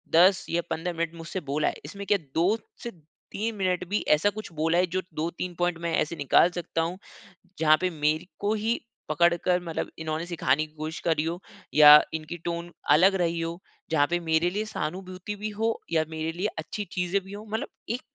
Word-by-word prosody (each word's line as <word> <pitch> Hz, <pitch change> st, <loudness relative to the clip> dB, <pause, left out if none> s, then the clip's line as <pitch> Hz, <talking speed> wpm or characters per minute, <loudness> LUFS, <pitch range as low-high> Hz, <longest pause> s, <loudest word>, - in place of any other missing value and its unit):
10 185 Hz, +3 st, +6 dB
या 170 Hz, +1 st, +1 dB
15 175 Hz, +2 st, -2 dB
मिनट 165 Hz, 0 st, -2 dB
मुझसे 165 Hz, +3 st, -5 dB
बोला 145 Hz, +1 st, -1 dB
है, -, -, -1 dB
इसमें 200 Hz, +6 st, -7 dB
क्या 205 Hz, -, +4 dB, 0.2 s
2 185 Hz, +7 st, +3 dB, 0.3 s
से 235 Hz, -, -4 dB, 0.4 s
3 220 Hz, +2 st, -2 dB
मिनट 185 Hz, -3 st, 0 dB
भी 205 Hz, -, +1 dB
ऐसा 155 Hz, +7 st, +4 dB
कुछ 215 Hz, -1 st, -8 dB
बोला 160 Hz, +2 st, +1 dB
है 180 Hz, -, +4 dB
जो 185 Hz, +2 st, -1 dB
2-3 170 Hz, +3 st, -3 dB
पॉइंट 175 Hz, -1 st, +1 dB
मैं 170 Hz, -1 st, -2 dB
ऐसे 155 Hz, +2 st, 0 dB
निकाल 145 Hz, +4 st, +4 dB
सकता 170 Hz, -1 st, -2 dB
हूँ, 170 Hz, +3 st, -2 dB, 0.6 s
जहाँ 155 Hz, -1 st, +6 dB
पे 185 Hz, -, +2 dB
मेरे 155 Hz, 0 st, 0 dB
को 205 Hz, +1 st, +1 dB
ही 220 Hz, +2 st, 0 dB, 0.3 s
पकड़ 170 Hz, +3 st, +4 dB
कर 180 Hz, -1 st, +3 dB
मतलब 165 Hz, -2 st, -3 dB
इन्होने 160 Hz, +1 st, -3 dB
सिखाने 155 Hz, -4 st, +1 dB
की 155 Hz, -, -26 dB
कोशिश 155 Hz, +1 st, -5 dB
करी 160 Hz, -2 st, +2 dB
हो 170 Hz, +2 st, -3 dB, 0.4 s
या 150 Hz, 0 st, +10 dB
इनकी 160 Hz, +2 st, -5 dB
टोन 170 Hz, 0 st, -3 dB, 0.2 s
अलग 185 Hz, +6 st, +6 dB
रही 170 Hz, -2 st, 0 dB
हो, 165 Hz, +1 st, -4 dB, 0.3 s
जहाँ 145 Hz, -2 st, +4 dB
पे 175 Hz, -, +2 dB
मेरे 165 Hz, +1 st, +2 dB
लिए 210 Hz, +3 st, -2 dB
सहानुभूति 185 Hz, +2 st, -5 dB
भी 215 Hz, -, -2 dB
हो 225 Hz, 0 st, +1 dB
या 160 Hz, -1 st, +2 dB
मेरे 160 Hz, 0 st, -3 dB
लिए 185 Hz, +5 st, -1 dB
अच्छी 205 Hz, +6 st, -5 dB
चीज़ें 180 Hz, +2 st, 0 dB
भी 195 Hz, -, -10 dB
हो? 210 Hz, +1 st, -8 dB
मतलब 220 Hz, -, -2 dB, 0.2 s
एक 240 Hz, +2 st, -2 dB
170 Hz, 205 wpm, -27 LUFS, 160-190 Hz, 0.6 s, या